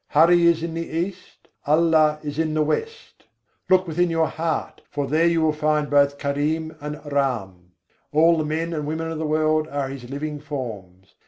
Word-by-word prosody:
Hari 170 +3 +5
is 165 -1 +3
in 170 -1 -3
the 165 0 -4
East: 180 +3 -5 0.2
Allah 155 0 +4
is 145 0 -5
in 155 -1 0
the 155 - +3
West. 455 - -4 0.4
Look 185 0 +4
within 175 +1 0
your 165 -1 +1
heart, 160 +1 -3
for 145 -1 -2
there 155 +5 +2
you 165 -1 +2
will 155 -1 +2
find 150 -1 0
both 140 0 +3
Karim 150 +3 -2
and 150 0 -5
Ram; 95 -11 -2 0.4
All 165 +3 +5
the - - 0
men 160 +2 -2
and 150 -2 -3
women 160 +1 -3
of 160 - -4
the 160 - -2
world 155 0 +1
are 140 -3 -3
His 130 -3 -8
living 145 +2 -4
forms. 105 -11 -7
155 Hz, 185 wpm, -23 LUFS, 145-165 Hz, 0.4 s, Hari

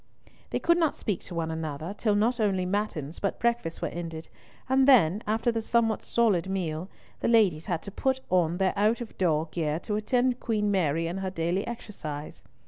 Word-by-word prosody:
They - - -1
could 340 0 +3
not 320 -3 +2
speak 205 -4 -2
to 180 - -8
one 165 -1 -1
another 160 +2 -4
till 210 -1 +1
not 235 +4 +2
only 195 -4 +1
matins 180 -6 -2
but 200 - -1
breakfast 235 -8 -1
were - - +1
ended, 165 -2 -6 0.4
and 265 +1 +4
then—after 220 - +4
the 225 -1 -2
somewhat 225 0 +1
solid 200 -7 +2
meal—the 180 -2 -4
ladies 200 -9 +3
had 170 -4 -2
to 200 - -7
put 265 +6 0
on 175 -2 +2
their 190 0 +2
out 215 +4 +2
of 235 - -7
door 160 -3 +2
gear 155 -2 -1
to 210 - -2
attend 250 +3 +1
Queen 210 -3 0
Mary 165 -4 +1
in 175 +3 -3
her 190 -1 -2
daily 175 +2 -1
exercise. 155 -11 -7
195 Hz, 185 wpm, -28 LUFS, 165-225 Hz, 0.4 s, and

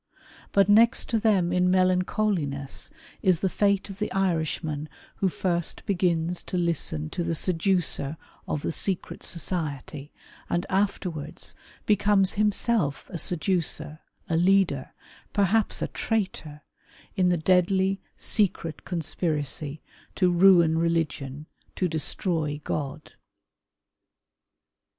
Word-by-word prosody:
But 200 -1 +4
next 220 +3 +5
to 225 - +1
them 195 -6 +2
in 180 0 +3
melancholiness 185 -6 0 0.3
is 180 -4 +2
the 190 - +1
fate 200 0 +1
of 195 - -11
the 210 - -2
Irishman 160 -5 -1 0.3
who 190 - +1
first 175 -2 -2
begins 175 -2 0
to 180 - -3
listen 160 - -1
to 175 - -2
the 165 0 -1
seducer 165 -4 +1 0.3
of 145 - -2
the - - -1
secret 185 +2 -2
society, 150 -4 -4 0.4
and 175 - 0
afterwards 180 -6 -2 0.3
becomes 205 -2 +3
himself 210 -7 0
a 170 - -3
seducer, 155 -3 0 0.3
a 165 - 0
leader, 175 -6 +2 0.4
perhaps 205 +2 +2
a - - -1
traitor, 185 -9 -3 0.5
in 185 -3 +3
the 175 - +2
deadly, 190 +3 +2 0.2
secret 170 -7 0
conspiracy 155 -3 -2 0.3
to 180 -2 +3
ruin 170 -3 +5
religion, 155 -4 -1 0.3
to 185 - 0
destroy 160 -1 -1
God. 145 0 -4
175 Hz, 110 wpm, -26 LUFS, 155-195 Hz, 0.5 s, next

